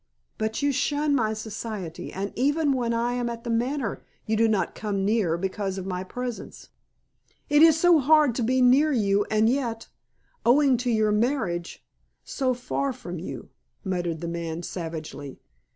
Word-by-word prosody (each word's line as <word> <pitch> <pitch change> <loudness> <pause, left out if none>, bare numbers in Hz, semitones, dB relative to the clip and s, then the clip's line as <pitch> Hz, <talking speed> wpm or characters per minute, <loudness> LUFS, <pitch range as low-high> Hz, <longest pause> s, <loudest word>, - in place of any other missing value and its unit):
But 220 +4 -2
you 285 - +3
shun 290 +2 0
my 220 -5 +1
society, 215 -5 -6
and 195 +2 -4
even 290 +3 +2
when 245 -3 -1
I 235 +1 0
am 245 -1 -1
at 230 0 -6
The 235 - -3
Manor, 245 0 -1 0.2
you 220 - 0
do 225 +1 +3
not 215 -3 0
come 200 -2 -2
near 200 -6 +1
because 190 +1 -3
of 190 - -5
my 185 -1 -3
presence." 245 +4 -7 0.8
"It 295 0 +5
is 320 -1 +7
so 350 -1 +5
hard 300 -1 +4
to 240 - -2
be 255 +3 +2
near 275 +5 +5
you 205 -5 +2
and 215 0 +3
yet, 235 -3 -1 0.5
owing 270 +2 +5
to 245 +1 -2
your 220 -2 +2
marriage, 210 -7 -1 0.4
so 255 -2 -1
far 270 +3 -2
from 180 -8 -7
you," 175 - -7 0.4
muttered 175 -4 -2
the 170 - -4
man 170 0 -4
savagely. 160 -5 -6
230 Hz, 170 wpm, -25 LUFS, 195-260 Hz, 0.8 s, is